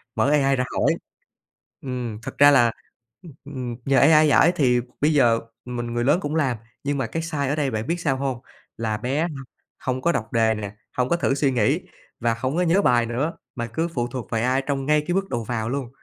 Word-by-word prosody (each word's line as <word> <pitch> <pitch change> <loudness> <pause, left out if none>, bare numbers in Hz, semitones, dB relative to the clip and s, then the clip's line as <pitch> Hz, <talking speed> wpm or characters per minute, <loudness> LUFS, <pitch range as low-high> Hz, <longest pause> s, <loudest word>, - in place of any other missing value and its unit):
mở - - +2
AI 140 -2 +3
ra 125 -1 0
hỏi. - - +3 0.9
Ừm, 125 -5 -4
thực 135 - -8
ra 145 0 +8
là, 120 -5 +4 0.7
ừm, 130 -4 -5
nhờ 135 -1 +3
AI 155 +1 +6
giải 160 +4 +5
thì 125 -5 +3 0.2
bây 150 +2 +3
giờ 120 -6 +4 0.3
mình 120 -1 -4
người 120 0 0
lớn 145 +7 +3
cũng 145 -4 -3
làm, 135 -6 +1 0.3
nhưng 140 0 -1
mà 135 - -1
cái 165 - -4
sai 150 -4 -2
ở 145 - 0
đây 145 -3 0
bạn 110 -1 -3
biết 170 +1 -1
sao 140 -6 0
hông? 135 -2 -2 0.4
Là 110 -1 -2
bé 135 +8 0 0.5
hông 130 0 -3
có 170 - +2
đọc 115 -7 -3
đề 115 -1 +3
nè, 105 -1 -6 0.2
hông 125 0 +1
có 170 - +2
thử 150 -5 +1
suy 140 -1 +1
nghĩ 115 -4 +2 0.4
và 115 0 +1
không 130 +5 -2
có 180 - +2
nhớ 180 +3 +3
bài 120 -5 +3
nữa 130 +8 -1 0.2
mà 120 -1 -3
cứ 160 +9 -2
phụ 125 -8 -2
thuộc 125 -1 -7
vào 115 - 0
AI 130 +2 +1
trong 135 -2 -2
ngay 150 0 +3
cái 175 - +1
bước 195 +1 0
đầu 120 -1 -2
vào 110 0 -2
luôn, 135 0 -3
130 Hz, 230 wpm, -23 LUFS, 120-150 Hz, 0.9 s, ra